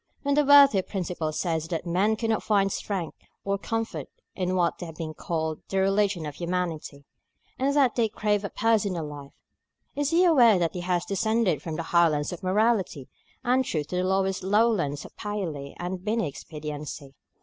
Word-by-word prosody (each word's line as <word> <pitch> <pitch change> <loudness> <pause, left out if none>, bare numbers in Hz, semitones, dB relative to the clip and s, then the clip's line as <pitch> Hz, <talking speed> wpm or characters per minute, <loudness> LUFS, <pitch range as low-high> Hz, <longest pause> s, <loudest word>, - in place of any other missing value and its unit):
When 285 0 +1
the 295 +1 +4
worthy 280 -7 +7
Principal 180 -5 -3
says 160 0 -2
that 165 0 -3
men 190 +6 +2
cannot 225 0 0
find 195 -2 +2
strength 185 -5 -4 0.2
or 200 0 -1
comfort 225 +2 -3 0.3
in 185 -1 -1
what 175 -1 0
has 165 -3 -7
been 155 -1 -5
called 160 -1 -3
the 195 - -2
Religion 195 -3 +1
of 150 - -5
Humanity, 170 -4 -4 0.5
and 275 +2 +1
that 270 -4 +4
they 230 -3 +1
crave 210 -1 0
a 200 - -3
personal 205 -7 +1
life, 145 -2 -9 0.6
is 290 0 0
he 340 +3 +4
aware 245 - +6
that 170 -2 0
he 180 - -4
has 175 -1 0
descended 205 - +1
from 160 -1 -5
the 165 - -3
highlands 165 -2 +2
of 175 - -8
morality 190 - +1 0.3
and 255 +1 +3
truth 155 - -3
to 180 - -2
the 180 - +1
lowest 190 0 0
lowlands 195 -8 +1
of - - -13
Paley 175 -10 -4
and 180 +1 -4
Binney 215 -3 0
expediency? 150 -1 -7
185 Hz, 175 wpm, -26 LUFS, 160-215 Hz, 0.6 s, worthy